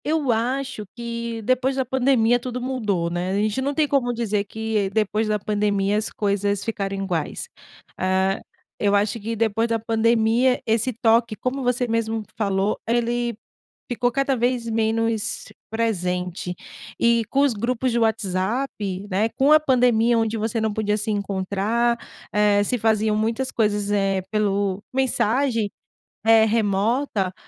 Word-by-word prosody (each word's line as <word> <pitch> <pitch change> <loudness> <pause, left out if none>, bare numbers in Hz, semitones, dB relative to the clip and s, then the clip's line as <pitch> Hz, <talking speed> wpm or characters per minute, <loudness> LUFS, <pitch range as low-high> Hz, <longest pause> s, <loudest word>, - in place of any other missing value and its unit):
Eu 300 -4 +1
acho 245 +1 -1
que 235 -1 -4
depois 255 +3 +1
da 265 -1 0
pandemia 245 -3 +3
tudo 250 0 -5
mudou, 220 -9 -1
né. 175 +2 -2
A - - -1
gente 215 +4 0
não 280 +2 -1
tem 305 0 +2
como 270 -4 +1
dizer 215 -3 -1
que 220 -1 -2
depois 215 +1 0
da 215 0 +1
pandemia 205 -1 0
as 215 +1 -1
coisas 200 -1 -1
ficaram 200 -3 -2
iguais. 180 -5 -3 0.5
Ah, 190 +1 +1 0.4
eu 205 -1 +2
acho 205 +2 +1
que 225 +2 -4
depois 225 +1 +1
da 230 -1 +1
pandemia 230 +2 +2
esse 225 +3 +1
toque, 230 -1 +2
como 255 +5 -3
você 250 0 0
mesmo 225 -1 -1
falou, 200 -1 0
ele 240 0 0 0.5
ficou 245 0 0
cada 275 +1 +1
vez 240 0 0
menos 225 -1 0 0.2
presente. 180 -5 -2 0.4
E 235 0 +3
com 275 - +2
os 280 -3 +3
grupos 245 +3 -1
de 235 - +1
WhatsApp, 205 -1 -1
né, 210 +4 +1
com 275 +5 +2
a 310 - +8
pandemia, 245 -5 +3
onde 225 0 0
você 225 +2 -1
não 220 -1 0
podia 210 -1 0
se 215 +1 -2
encontrar, 205 +4 0 0.4
eh, 210 -1 +3
se 245 +4 -1
faziam 220 -1 +2
muitas 225 +4 -1
coisas, 210 -2 0
eh, 195 -2 +1
pelo 200 -2 0
mensagem 255 -3 +1 0.6
eh, 225 0 +6
remota. 215 -1 0
225 Hz, 150 wpm, -23 LUFS, 205-240 Hz, 0.6 s, a